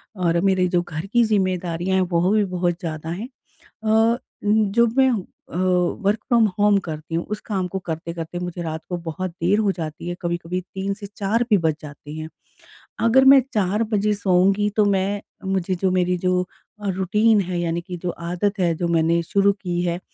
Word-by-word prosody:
और 170 -2 +1
मेरे 190 -2 +3
जो 175 -1 +1
घर 165 0 -6
की 240 -1 +5
ज़िम्मेदारियाँ 185 -3 0
हैं - - +3
वो 175 +2 +2
भी 215 -1 +3
बहुत 175 -2 -1
ज़्यादा 160 -1 -5
हैं। 205 +9 -5 0.6
अ, 225 +2 +3 0.3
जब 220 +3 +2
मैं 265 -1 +6 0.4
अ, - - -5 0.5
वर्क़ 200 +2 +2
फ्रॉम 235 -3 +5
होम 205 0 +4
करती 160 -2 -6
हूँ 170 - 0
उस 210 - -3
काम 190 -4 -1
को 190 - -3
करते-करते 165 +1 -5
मुझे 175 -1 -5
रात 160 -1 -4
को 180 - -2
बहुत 170 +2 -4
देर 180 +4 +1
हो 205 -3 +2
जाती 160 0 -6
है, 175 - -2
कभी-कभी 175 +1 -2
3 195 +1 -2
से 200 -1 -9
4 215 +4 +1
भी 210 - +6
बज 160 -2 +1
जाते 150 0 -10
हैं। 155 0 -6 0.8
अगर 265 +3 +5
मैं 270 0 +9
4 210 +1 +1
बजे 210 +1 +2
सोऊँगी 195 +1 +2
तो 210 -1 +4
मैं 200 +1 0 0.3
मुझे 190 -1 0
जो 185 +1 0
मेरी 180 0 +1
जो 180 0 +1 0.4
अ, 200 - -2
रूटीन 205 +3 +3
है 180 -1 -3
यानी 170 0 -1
कि 180 0 -7
जो 180 - -1
आदत 180 +5 -2
है, 170 -2 +2
जो 170 +2 -2
मैंने 170 0 +2
शुरू 200 +3 +3
की 175 -2 -2
है 175 0 -1
185 Hz, 195 wpm, -22 LUFS, 170-205 Hz, 0.8 s, मैं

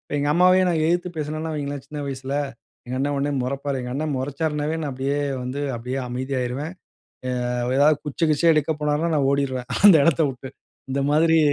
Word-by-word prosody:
எங்க 145 0 0
அம்மாவையும் 185 +1 +5
நான் 160 -2 +1
எயித்து 175 +2 +1
பேசுனேனா 155 +1 -3
வையுங்களேன் 145 -2 -4
சின்ன 150 +1 -7
வயசுல, 135 0 -4 0.5
எங்க 125 +1 -4
அண்ண 145 +2 0
உடனே 140 +1 0
மொறப்பாரு. 135 +1 -2
எங்க 125 0 -5
அண்ணன் 150 0 -2
மொறச்சார்னாவே 150 +3 -2
நான் 145 - -2
அப்படியே 135 +2 -1 0.2
வந்து 130 +3 -4 0.2
அப்டியே 125 +3 -4
அமைதியாயிருவேன். 130 +4 -3 0.8
அ - - -2 0.3
எதாவது 145 +1 +5
குச்ச 155 +3 0
கிச்சிய 160 +2 +4
எடுக்க 155 +1 +1
போனார்னா 150 +3 0
நான் 135 -2 +2
ஓடிருவேன் 130 -2 -2
அந்த 205 -3 +9
இடத்த 165 0 +3
வுட்டு 130 0 -9 0.4
இந்த 140 +1 0
மாதிரி 160 +2 +4
145 Hz, 170 wpm, -23 LUFS, 135-155 Hz, 0.8 s, அந்த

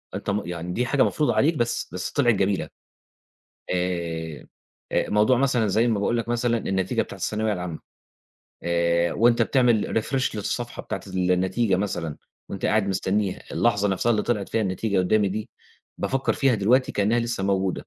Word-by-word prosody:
أنت - - -4
م 100 +1 0
يعني 90 0 -4
دي 125 - 0
حاجة 130 +2 +3
مفروضة 150 - +1
عليك 160 +4 +3
بس، 120 -4 -1
بس 90 - -4
طلعت 120 -5 +3
جميلة 95 -1 0 1.1
آآ، 85 -3 -3 0.5
آآ، - - 0
موضوع 105 +5 +4
مثلًا 125 -4 +2
زيّ 110 +4 +2
ما 110 -3 +1
باقول 120 +4 +1
لك 115 0 -2
مثلًا 120 0 +1
النتيجة 95 -3 0
بتاعة - - -10
الثانوية 110 0 -1
العامة 90 -4 -4 0.8
آآ، 85 0 +1
وأنت 115 +1 +3
بتعمل 120 -4 +2
refresh 130 +1 -1
للصفحة 120 +4 -3
بتاعة - - -4
النتيجة 95 +3 +1
مثلًا، 90 -6 -3 0.3
وأنت 100 - -3
قاعد 105 -2 +2
مستنّيها، 95 +1 -1
اللحظة 105 -4 +2
نَفْسها 95 +5 +1
اللي 105 -3 +2
طلعت 105 -4 -1
فيها 115 - 0
النتيجة 100 0 -1
قدّامي 100 +3 +2
دي، 105 +2 -4 0.5
بافكّر 135 0 0
فيها 135 -3 +2
دلوقتي 120 +6 +2
كإنها 105 +4 +2
لسه 115 -4 -2
موجودة 95 -2 -1
105 Hz, 165 wpm, -24 LUFS, 95-120 Hz, 1.1 s, موضوع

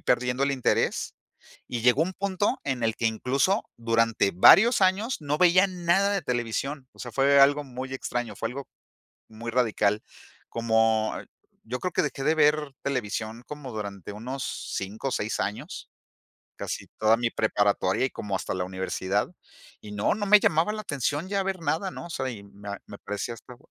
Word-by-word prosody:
perdiendo 125 +2 +1
el 140 - +1
interés 130 -3 0 0.5
y 120 - -3
llegó 125 +5 +4
un 185 +3 -2
punto 200 +1 -1
en 130 -4 -2
el 115 0 +1
que 115 - -1
incluso 135 - +1
durante 115 -3 +2
varios 210 - +7
años 200 +6 +2
no 145 0 -1
veía 180 +3 +5
nada 185 +2 +1
de 195 - -1
televisión. 125 +3 -2
O - - -15
sea, 120 - -6
fue 140 +4 +4
algo 145 +2 +5
muy 130 0 -7
extraño, 120 -4 -3
fue 115 - -3
algo 140 +2 -7 0.6
muy 115 +1 -7
radical, 110 -4 +1 0.5
como 110 -1 +2 0.5
yo 125 +3 -4
creo 180 -2 -3
que - - +2
dejé 140 -2 -3
de 155 +2 +3
ver 150 -2 +3
televisión 115 -4 -3
como 145 -3 -7
durante 100 -3 -6
unos 125 +5 -5 0.3
5 100 +7 -4
o - - -7
6 110 -2 -2
años, 105 - -4 0.7
casi - - -5
toda 110 +1 +4
mi 120 0 +1
preparatoria 105 +1 +1
y - - -5
como 100 -2 -5
hasta - - -3
la 90 -1 -1
universidad, 95 +2 -2 0.5
y 105 - -10
no, 105 +1 +1
no 205 0 -2
me 210 +1 +7
llamaba 165 +4 +2
la 215 - -4
atención 145 - -2
ya 200 0 0
ver 190 -1 -3
nada, 165 +5 -1
¿no? 170 - -8
O - - -11
sea, 130 -4 -2
y 105 -5 -9
me 100 0 -10 0.2
me 100 - -9
parecía 105 +3 -4
hasta 120 +2 -13
125 Hz, 180 wpm, -26 LUFS, 110-155 Hz, 0.7 s, varios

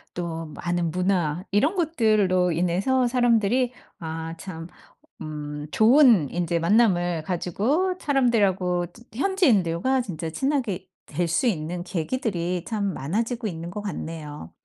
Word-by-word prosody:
또 165 -2 -4
많은 175 -1 -1
문화 180 -2 0
이런 285 - +3
것들로 215 - +2
인해서 185 +10 +1
사람들이 245 0 +2 0.3
아 160 0 -5
참 165 -2 -8 0.5
음 150 -1 -6
좋은 225 - +5
인제 170 -1 -1
만남을 175 -4 +2
가지고 220 - 0
사람들하고 200 - +2
즈 235 - -17
현지인들과 260 - +2
진짜 170 -8 -5
친하게 240 - -1 0.2
될 175 -1 -2
수 170 +10 +1
있는 175 -2 -2
계기들이 180 -1 -2
참 205 -4 -1
많아지고 220 - -2
있는 170 -2 -5
것 210 - -5
같네요. 155 - -6
185 Hz, 265 characters per minute, -24 LUFS, 170-235 Hz, 0.5 s, 좋은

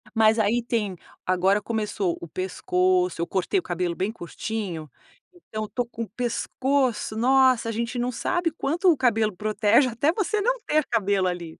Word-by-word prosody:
mas 220 0 +4
aí 220 +3 +2
tem 210 -6 -2 0.3
agora 190 +3 +2
começou 210 -5 -2
o 170 - -7
pescoço, 180 0 0
eu 170 - -1
cortei 190 - 0
o - - -8
cabelo 175 -1 -2
bem 195 +4 -1
curtinho, 180 -4 -5 0.4
então 215 -11 -7
eu - - -13
tô 245 -2 -2
com 235 -1 -8
o 220 - -9
pescoço 250 +1 -1
nossa, 255 0 +4
a - - -1
gente 235 +2 -3
não 245 +1 0
sabe 350 +7 0
quanto 335 +4 +2
o 310 - +1
cabelo 220 -5 +2
protege 215 +5 +3
até 265 +7 +1
você 420 +2 -1
não - - +1
ter 310 0 +2
cabelo 200 -4 +1
ali. 175 -3 -5
220 Hz, 175 wpm, -25 LUFS, 185-255 Hz, 0.4 s, mas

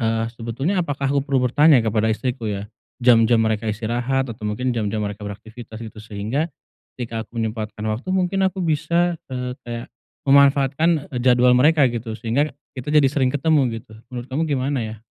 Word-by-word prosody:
Eee, 115 0 0
sebetulnya 125 - -2
apakah 145 -4 -3
aku 140 - +2
perlu 135 -2 0
bertanya 135 0 +5
kepada 110 0 +1
istriku 120 +1 -2
ya? 100 -1 -3 0.4
Jam-jam 115 -1 +5
mereka 110 0 -1
istirahat 120 +4 -1
atau 110 - -11
mungkin 125 +5 -1
jam-jam 110 -2 -1
mereka 100 +1 -5
beraktivitas 110 +2 -9
gitu, 110 -1 -10
sehingga 110 +9 -3 0.5
ketika 115 -2 -4
aku 120 - -15
menyempatkan 110 -1 -3
waktu 110 +10 -4
mungkin 190 +1 +1
aku 185 -1 -4
bisa, 170 +2 +1
eee, 125 0 -3
kayak 120 0 -5 0.4
memanfaatkan, 140 +3 +4
eee, 125 - -2
jadwal 125 0 +5
mereka 150 +3 +5
gitu, 115 -1 -4
sehingga 120 +7 0 0.2
kita 130 +4 -4
jadi 150 -3 +5
sering 130 -3 +1
ketemu 135 -6 +2
gitu. 110 - -19 0.2
Menurut 120 -1 -5
kamu 150 +5 -1
gimana 140 0 0
ya? 110 -1 -7
125 Hz, 170 wpm, -22 LUFS, 110-140 Hz, 0.5 s, bertanya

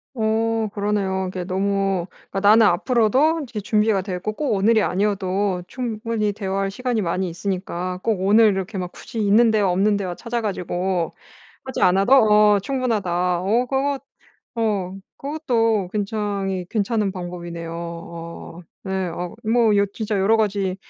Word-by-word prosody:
어 225 0 0
그러네요. 200 -2 -1
이게 185 -1 -4
너무 195 -1 0 0.2
그니까 195 - -1
나는 215 +3 +6
앞으로도 255 - +3
이제 235 -5 -6
준비가 210 -1 +2
되어 185 -1 -4
있고 200 +4 -3
꼭 285 +1 -1
오늘이 215 +3 +3
아니어도 195 -1 0
충분히 225 -2 -2
대화할 195 -1 -2
시간이 245 0 -1
많이 185 0 -1
있으니까 180 0 -4
꼭 220 -3 0
오늘 210 +4 +5
이렇게 195 +1 -3
막 180 -1 -4
굳이 230 - -8
있는 215 +3 +4
대화 210 -3 +2
없는 200 +3 +2
대화 185 -3 -4
찾아 235 +3 -3
가지고 180 -3 -2 0.5
하지 260 -1 -5
않아도 195 +6 +4
어 210 -5 +6
충분하다. 190 -8 0
어 225 +7 +1
그것 270 +1 -1 0.5
어 205 -5 -1 0.2
그것도 235 - 0
굉장히 200 -3 -2
괜찮은 210 0 0
방법이네요. 175 -2 -6
어 170 0 -8 0.2
네. 190 -1 -2
어 175 +1 -5
뭐 225 0 +3 0.2
진짜 215 -2 -2
여러 200 +4 +4
가지 200 -3 0
200 Hz, 315 characters per minute, -22 LUFS, 185-225 Hz, 0.5 s, 나는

